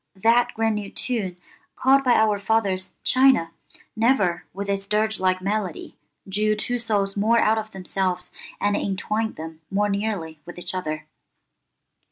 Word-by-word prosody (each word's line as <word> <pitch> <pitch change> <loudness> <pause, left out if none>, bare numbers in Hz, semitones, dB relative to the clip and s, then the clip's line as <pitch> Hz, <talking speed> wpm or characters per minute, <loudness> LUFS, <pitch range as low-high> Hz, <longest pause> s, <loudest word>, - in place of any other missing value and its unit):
That 230 +5 +3
grand 225 -1 +1
old 200 -1 -8
tune, 210 -8 -2 0.4
called 270 +1 +4
by 250 -2 +4
our 215 -2 +3
fathers 200 -3 0
'China,' 255 -11 +4 0.4
never, 220 -7 +2
with 200 +2 -5
its 195 0 -2
dirge 215 +1 +1
like 185 0 +1
melody, 200 -3 -3 0.3
drew 210 +2 +2
two 245 +3 -2
souls 205 -4 0
more 220 +3 +3
out 220 -1 +3
of 220 0 -6
themselves 185 -2 -1 0.3
and 205 0 +1
entwined 215 +3 -1
them 160 0 -8
more 205 +1 +1
nearly 200 -6 -2
with 175 - -10
each 175 0 -5
other. 155 -4 -3
205 Hz, 150 wpm, -24 LUFS, 185-220 Hz, 0.4 s, called